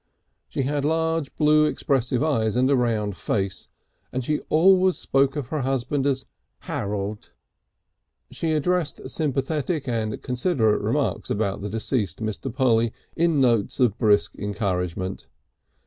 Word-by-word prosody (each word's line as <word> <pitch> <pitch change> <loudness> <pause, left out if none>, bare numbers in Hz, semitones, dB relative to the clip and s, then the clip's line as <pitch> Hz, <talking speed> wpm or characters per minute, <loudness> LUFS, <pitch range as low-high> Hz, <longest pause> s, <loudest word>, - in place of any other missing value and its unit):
She 135 - -2
had 145 +1 -1
large 160 -1 0
blue 150 0 +4
expressive 135 -3 0
eyes 115 -9 +1
and 125 +1 +3
a - - +5
round 110 -5 0
face, 95 +3 -2 0.4
and 130 - -2
she 150 +4 0
always 185 +3 +5
spoke 135 +1 +1
of 140 -5 -4
her 155 -2 -1
husband 135 +2 0
as 135 -1 0 0.4
Harold. 105 +1 -4 1.0
She 160 -1 -1
addressed 165 +1 0
sympathetic 150 +1 -1
and 110 -3 -2
considerate 125 - +1
remarks - - -1
about 100 -2 -1
the 105 - -4
deceased 110 -3 -1
to - - -6
Mr. 110 +4 -3
Polly 115 -3 +2 0.2
in 165 -3 +2
notes 120 -5 +2
of 120 -4 +2
brisk 105 -3 +3
encouragement. 95 -3 -3
130 Hz, 135 wpm, -24 LUFS, 110-150 Hz, 1.0 s, a